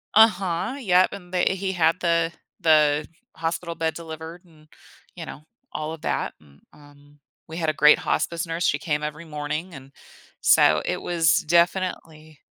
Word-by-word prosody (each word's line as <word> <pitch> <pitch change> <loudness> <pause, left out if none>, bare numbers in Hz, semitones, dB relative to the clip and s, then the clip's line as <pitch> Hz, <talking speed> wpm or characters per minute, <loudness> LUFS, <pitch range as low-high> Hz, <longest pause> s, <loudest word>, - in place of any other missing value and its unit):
Uh-huh, 210 0 +3
yep, 185 -6 +3
and 180 -1 -11
they 180 - +2
he 190 0 -2
had 165 0 +2
the 170 -1 +1 0.3
the 150 -2 +3 0.3
hospital 165 +1 -3
bed 160 0 -1
delivered 165 +1 -9
and, 155 -2 -22 0.5
you - - -7
know, - - -9 0.3
all 155 +1 -4
of 160 - -10
that, - - -2
m 70 -1 -22
um, 145 0 -20 0.3
we 160 +1 -8
had 160 -2 0
a - - 0
great 150 +1 +5
hospice 170 0 -1
nurse. 165 +2 -2
She 145 - +1
came 150 -2 -2
every 150 +2 -5
morning, 155 +3 -5
and 135 0 -12 0.5
so 75 0 +5
it 180 - -2
was 165 -2 +2
definitely 170 -3 0
165 Hz, 165 wpm, -24 LUFS, 150-175 Hz, 0.5 s, great